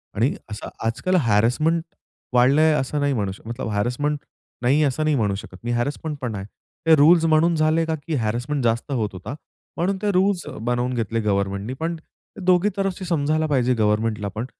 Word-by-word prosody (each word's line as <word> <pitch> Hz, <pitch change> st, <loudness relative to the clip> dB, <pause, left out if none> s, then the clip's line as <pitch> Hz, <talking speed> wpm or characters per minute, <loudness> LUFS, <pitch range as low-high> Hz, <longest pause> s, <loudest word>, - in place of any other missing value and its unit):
आणि 115 Hz, +7 st, +2 dB, 0.2 s
असं 105 Hz, -, -6 dB, 0.2 s
आजकाल 130 Hz, +11 st, 0 dB
हॅरेसमेंट 125 Hz, +11 st, +2 dB, 0.5 s
वाढलंय 140 Hz, +6 st, +5 dB
असं 145 Hz, +1 st, -1 dB
नाही 145 Hz, 0 st, +1 dB
म्हणू 100 Hz, -6 st, -1 dB
शकत. 115 Hz, +5 st, -8 dB
हॅरेसमेंट 125 Hz, +8 st, 0 dB, 0.4 s
नाही, 140 Hz, +5 st, +3 dB
असं 145 Hz, +2 st, 0 dB
नाही 155 Hz, -1 st, +2 dB
म्हणू 105 Hz, -6 st, +1 dB
शकत 95 Hz, -2 st, -9 dB
मी, 120 Hz, -, -2 dB
हॅरेसमेंटपण 130 Hz, -1 st, -2 dB
आहे. 95 Hz, 0 st, -5 dB, 0.4 s
ते 160 Hz, -, +8 dB
रूल्स 165 Hz, +3 st, +6 dB
म्हणून 165 Hz, +1 st, +3 dB
झाले 155 Hz, +1 st, +2 dB
का 160 Hz, 0 st, -1 dB
की 160 Hz, -, -1 dB
हॅरेसमेंट 125 Hz, +4 st, -1 dB
जास्त 115 Hz, +4 st, 0 dB
होत 110 Hz, -6 st, 0 dB
होता. 100 Hz, +9 st, -7 dB, 0.4 s
म्हणून 190 Hz, +3 st, 0 dB
ते 210 Hz, -1 st, +1 dB
रूल्स 185 Hz, -1 st, +1 dB, 0.2 s
बनवून 120 Hz, +2 st, -1 dB
घेतले 115 Hz, -1 st, -1 dB
गव्हर्नमेंटनी, 100 Hz, +2 st, -1 dB
पण 165 Hz, +1 st, -2 dB, 0.5 s
दोघी 185 Hz, +2 st, +4 dB
तरफशी 195 Hz, -1 st, -2 dB
समजायला 155 Hz, -1 st, +1 dB
पाहिजे 130 Hz, -3 st, +2 dB
गव्हर्नमेंटलापण. 110 Hz, 0 st, 0 dB
130 Hz, 165 wpm, -23 LUFS, 115-160 Hz, 0.5 s, ते